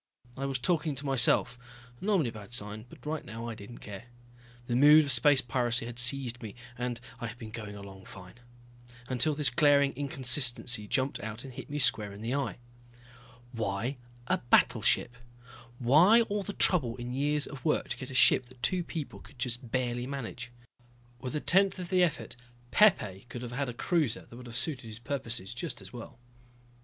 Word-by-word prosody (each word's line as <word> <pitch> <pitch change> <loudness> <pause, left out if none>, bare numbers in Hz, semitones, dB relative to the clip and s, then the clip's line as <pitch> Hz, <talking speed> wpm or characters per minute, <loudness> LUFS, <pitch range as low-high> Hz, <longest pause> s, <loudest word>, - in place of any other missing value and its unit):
I 135 +1 -3
was 135 -1 -2
talking 150 +2 0
to 140 +3 -6
myself, 125 -2 +2 0.4
normally 190 - +1
a - - -10
bad 105 +1 -10
sign, 110 0 0
but - - -16
right 155 0 -3
now 115 +1 -7
I 115 - -4
didn't 110 +2 -11
care. 105 +2 -8 0.6
The 120 - -2
mood 150 +4 +7
of 140 - -1
space 135 +2 +5
piracy 120 -1 -1
had 120 0 -5
seized 125 -1 +5
me 110 -4 -8 0.2
and 125 -1 -4 0.2
I 120 - -4
had 115 +2 -9
been 110 -2 -9
going 105 -3 -7
along 95 -1 -11
fine. 95 +4 -13 0.7
Until 140 +4 +1
this 145 -5 +1
glaring 140 +1 +4
inconsistency 125 -4 +2
jumped 130 +5 -1
out 110 +2 -6
and 135 -2 -10
hit 130 +4 -9
me 145 - -4
square 110 -7 +2
in 100 - -11
the 115 +3 -3
eye. 140 -1 -2 0.9
Why 115 +3 -3 0.3
a - - 0
battleship? 120 0 +2 0.6
Why 160 - +5
all 210 -2 -2
the 200 +1 -6
trouble 130 -12 +2
and 120 0 -6
years 145 +1 0
of 135 -3 -10
work 155 - 0
to - - -2
get 130 - -7
a 130 - -8
ship 130 -1 +5
that 125 -1 -19
two 180 -1 +2
people 160 -3 -6
could 140 - -17
just 120 0 -3
barely 120 0 -2
manage? 125 -2 -6 0.7
With 125 +4 -5
a - - 0
tenth 195 +1 +3
of 180 -2 -6
the 185 -1 +3
effort 165 -8 -1 0.4
Pepe 115 - +3
could 120 - -7
have 120 - -6
had 135 +1 -2
a - - -5
cruiser 155 -5 0
that - - -14
would 125 0 -11
have 120 0 -5
suited 125 -2 -2
his 110 -1 -7
purposes 120 -4 -5
just 150 +4 -4
as 95 -1 -11
well. 120 -1 -10
125 Hz, 190 wpm, -29 LUFS, 115-145 Hz, 0.9 s, mood